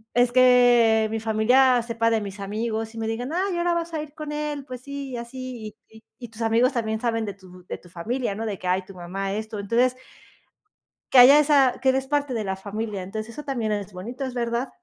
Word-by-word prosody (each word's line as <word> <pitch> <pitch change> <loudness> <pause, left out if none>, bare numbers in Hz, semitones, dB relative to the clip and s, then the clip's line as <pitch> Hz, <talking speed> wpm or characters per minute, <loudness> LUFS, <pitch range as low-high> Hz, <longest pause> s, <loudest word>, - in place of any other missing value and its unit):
es 245 0 +4
que 245 -3 +5
mi 225 - -1
familia 245 +4 +4
sepa 230 -1 0
de 225 -1 +2
mis 200 0 -7
amigos 220 +2 -3
y - - -9
me 225 - -2
digan: 240 +5 -3
"Ay, 370 +1 0
ahora 345 0 +1
vas 335 0 -3
a 315 - -2
ir 300 -1 -10
con 305 -1 -6
él, 295 -2 -4
pues 255 -2 -8
sí, 280 0 -6
y 245 - -4
así", 235 -2 -7
y 220 - -16
y 220 - -18 0.2
y 240 -2 -8
tus 225 +1 -11
amigos 230 +4 +3
también 220 -2 -1
saben 225 -2 -1
de 200 -2 -6
tu 185 -2 -16
de - - -5
tu 175 - -18
familia, 220 +7 -3
¿no? 225 +2 -4
De 205 -2 -3
que: 185 - -6
"Ay, 185 +1 +1
tu 195 - -13
mamá, 195 +3 -4
esto". 215 0 -5
Entonces, 235 +5 +1 1.2
que 260 - +7
haya 270 +4 +9
esa 280 -4 +4
que 265 - +3
eres 265 0 +1
parte 290 -1 0
de 225 -2 -2
la 190 0 -2
familia. 205 0 -5
Entonces, 215 +4 -6
eso 295 - -7
también 240 -6 -2
es 205 -1 -5
bonito, 235 +9 -6
es 260 - -5
verdad. 240 +1 -2
235 Hz, 235 wpm, -24 LUFS, 215-260 Hz, 1.2 s, haya